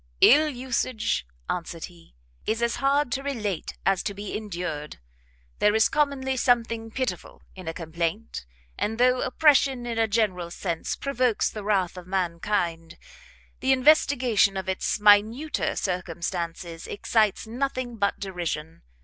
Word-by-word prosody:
"Ill 305 +3 +7
usage," 250 - -1 0.2
answered 165 -1 -4
he, 170 - -17 0.3
"is 225 +2 0
as 235 - 0
hard 275 -1 +2
to 265 - -1
relate 215 - -3
as 195 -1 +3
to 200 - -4
be 205 0 -5
endured. 175 -8 -5 0.6
There 210 +1 +4
is 220 - +4
commonly 280 -3 0
something 230 -2 +1
pitiful 220 -7 -4
in 185 -3 -10
a 165 - -2
complaint; 170 - -4 0.3
and 220 +1 -1
though 250 +1 +3
oppression 270 -2 +3
in 230 -1 -2
a 225 - +3
general 200 -5 0
sense 170 -1 -3
provokes 255 -5 0
the 215 - -7
wrath 190 -4 0
of 180 -1 -9
mankind, 170 -2 -2 0.6
the 265 - +1
investigation 255 -7 +4
of 190 - -4
its 190 +2 -1
minuter 215 +8 +3
circumstances 170 -2 -4
excites 215 0 +1
nothing 250 0 -3
but 200 -1 0
derision. 170 -5 -4
210 Hz, 135 wpm, -26 LUFS, 180-250 Hz, 0.6 s, Ill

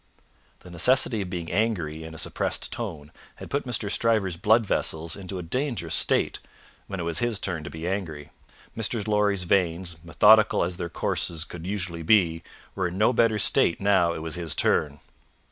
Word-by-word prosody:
The 90 - -13
necessity 115 +5 +3
of 95 - -5
being 85 -2 -5
angry 85 -8 -1
in 80 0 -9
a - - -9
suppressed 80 - -2
tone 80 -11 -6 0.2
had - - -11
put 140 0 -1
Mr. 115 -3 -2
Stryver's 105 -7 +1
blood 110 +6 +3
vessels 80 -3 -1
into 95 -1 -7
a 90 - -5
dangerous 105 - -2
state - - +1 0.5
when 100 - -5
it - - -2
was 85 -1 -1
his 120 -3 0
turn 85 -6 -3
to - - -5
be 80 +3 -6
angry; 85 -7 -4 0.4
Mr. 110 -1 -2
Lorry's 105 -3 +1
veins, 85 -1 0
methodical 105 +5 +5
as 85 0 -3
their 85 -1 -4
courses 80 0 -2
could 85 0 -9
usually 90 -4 -3
be, 85 -2 +3 0.3
were 95 -2 -1
in 90 +1 -6
no 110 +5 +3
better 115 -2 +3
state 85 -4 +2
now 95 -4 +3
it 80 - -5
was 80 -1 -4
his 85 -3 -1
turn. 75 -1 +1
90 Hz, 180 wpm, -25 LUFS, 85-105 Hz, 0.5 s, methodical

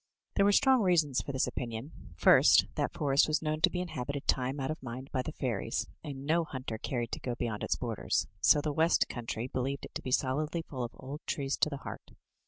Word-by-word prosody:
There 200 - +3
were 205 - +5
strong 265 +3 +5
reasons 160 -9 +3
for - - -5
this 130 -1 +1
opinion. 120 +3 -5 0.2
First, - - +6
that - - -1
for 150 -5 -1
est 140 - +5
was 155 +1 0
known 155 0 -1
to - - +6
be 180 - -2
inhabited 140 -5 -4
time 130 +2 +1
out 135 +2 -1
of 155 - -6
mind 130 +2 -7
by 130 - 0
the 155 - -5
fairies, 120 -9 -2 0.2
and 140 -2 -6
no 165 +3 +2
hunter 130 -7 -5
cared 120 -2 -3
to - - -3
go 125 -2 -3
beyond 115 -3 -3
its - - 0
borders 115 -7 -1
— - - -39
so 150 - +6
the 150 0 -2
west 160 +3 +3
coun 120 -2 -6
try 115 +1 -2
believed 130 +2 -3
it - - -13
to - - -4
be - - -5
solidly 150 +6 0
full 130 -5 -5
of 120 - -6
old 140 +3 -8
trees 140 -1 -1
to - - +2
the 140 - -5
heart. - - -8
140 Hz, 240 wpm, -31 LUFS, 125-155 Hz, 0.2 s, First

